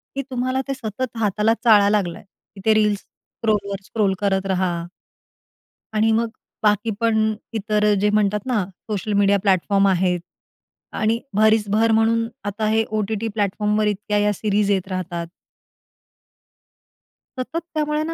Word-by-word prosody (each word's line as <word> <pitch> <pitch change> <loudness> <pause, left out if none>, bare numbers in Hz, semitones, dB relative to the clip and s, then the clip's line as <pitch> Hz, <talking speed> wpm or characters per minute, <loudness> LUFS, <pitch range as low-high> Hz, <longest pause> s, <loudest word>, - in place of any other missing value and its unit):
की 275 - -1
तुम्हाला 255 +1 -1
ते 275 - -1
सतत 235 -1 -5
हाताला 210 +1 +2
चाळा 205 -3 +6
लागला 195 -5 0
आहे - - -15 0.3
की 195 - -10
ते 220 - +5
रील्स 210 -2 +2
स्क्रोलवर 200 -3 -4
स्क्रोल 205 -4 0
करत 195 -1 +1
रहा. 185 -1 +1 1.2
आणि 220 +1 +3
मग 230 +1 +1 0.3
बाकी 210 +2 +2
पण 220 -1 +2 0.2
इतर 210 0 +1
जे 210 - +2
म्हणतात 210 0 +1
ना, 235 -7 +1 0.3
सोशल 210 0 -2
मीडिया 200 0 +4
प्लॅटफॉर्म 195 +1 +2
आहेत 180 -1 +2 0.8
आणि 220 +2 +2 0.2
भरीसभर 215 +1 +3
म्हणून 230 +1 +2 0.2
आता, 205 +2 -3
हे 220 +1 +2
ओ-टी-टी 215 +1 -2
प्लॅटफॉर्मवर 210 0 0
इतक्या 210 0 -1
या 205 0 +2
सीरीज 205 0 0
येत 190 -2 0
राहतात. 175 -2 -4 2.1
सतत 255 +6 -3
त्यामुळे 300 0 0
ना 330 +1 -3
210 Hz, 140 wpm, -22 LUFS, 200-225 Hz, 2.1 s, चाळा